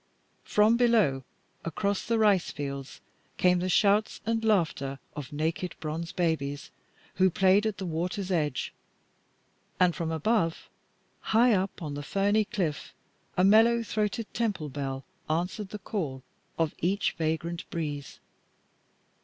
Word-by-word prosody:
From 215 +3 +4
below, 220 - +3 0.4
across 200 +4 -1
the 230 - 0
rice 205 -5 +3
fields, 140 -1 -6 0.4
came 180 -1 +4
the 185 +1 -1
shouts 205 +2 +3
and 225 0 0
laughter 160 -10 +1 0.2
of 145 -1 -6
naked 160 +4 -2
bronze 165 +2 -4
babies 145 -5 -1 0.5
who 190 0 +5
played 195 +3 +4
at 210 -2 -3
the 190 - -4
water's 180 +4 -2
edge, 150 -6 -1 1.1
and 180 -1 +4
from 165 -3 -2
above, 165 +1 0 0.7
high 240 0 +6
up 190 -2 -1
on 150 -2 -4
the 145 - -4
ferny 200 +7 +1
cliff, 170 -9 -3 0.4
a 180 - +4
mellow 225 +4 +5
throated 215 +1 -1
temple 205 -10 -1
bell 135 -1 -4 0.2
answered 180 +5 -1
the 210 - -5
call 160 - -4 0.3
of 165 -2 +1
each 195 +4 +1
vagrant 165 +1 -3
breeze. 145 -4 -4
180 Hz, 130 wpm, -28 LUFS, 155-210 Hz, 1.1 s, high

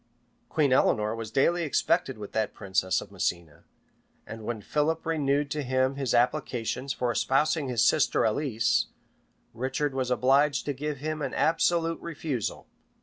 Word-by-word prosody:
[*] 120 - -41
Queen 145 -4 +2
Eleanor 110 -4 +2
was 115 -2 -6
daily 170 +9 +2
expected 140 -4 +1
with 105 -1 -8
that 110 -1 -1
princess 95 -2 0
at - - -17
Messina;[] 85 -4 -3 0.6
and 110 +1 -8
when 115 0 -3
Philip 150 +9 -1
renewed 145 -3 0
to 150 - -1
him 130 0 +1
his 135 -3 -1
applications 125 0 0
for 125 -2 -1
espousing 140 +5 +1
his 115 -2 +2
sister - - +3
Alice, 115 0 +1 0.7
Richard 135 +4 -2
was 130 -2 -1
obliged 135 +3 +3
to 145 - -1
give 150 +2 -4
him 155 +2 -4
an - - -3
absolute 165 0 +1
refusal. 145 -8 -4
135 Hz, 150 wpm, -27 LUFS, 115-150 Hz, 0.7 s, sister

